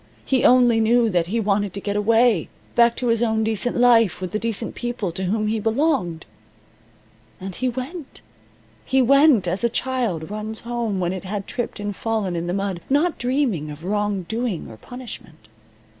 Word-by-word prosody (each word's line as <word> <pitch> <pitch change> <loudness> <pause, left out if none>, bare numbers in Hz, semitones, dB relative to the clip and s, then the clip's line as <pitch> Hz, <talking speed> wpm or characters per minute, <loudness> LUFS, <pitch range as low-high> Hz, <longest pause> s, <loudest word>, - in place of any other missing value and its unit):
He 260 -2 +1
only 245 -2 +5
knew 230 0 +3
that 175 -2 +1
he 225 +6 -1
wanted 205 -2 0
to 200 - -4
get 205 0 -3
away 225 -2 +3 0.2
back 235 0 +4
to 250 - -4
his 230 -1 +2
own 220 -2 +1
decent 220 +2 0
life 235 -4 +4
with 185 -1 -5
the 215 - -1
decent 225 0 -2
people 240 -6 -3
to 185 +3 -4
whom 215 +4 0
he 220 +1 0
belonged. 225 - 0 1.1
And 190 0 -6
he 255 +7 -1
went. 265 +6 -7 0.6
He 265 - +1
went, 275 - +5
as 185 +6 -1
a 235 - +3
child 230 -10 -2
runs 215 +1 -4
home 235 -4 -2
when 180 0 -1
it 190 - -6
had 200 +1 -4
tripped 240 -3 -4
and 205 -1 -4
fallen 215 -5 -2
in 170 0 -3
the - - -1
mud, 195 -2 -2
not 305 +5 +1
dreaming 245 - 0
of 150 +2 -9
wrong 205 -1 -1
doing 220 -1 -3
or 110 - -11
punishment. 195 - -10
220 Hz, 185 wpm, -22 LUFS, 190-240 Hz, 1.1 s, only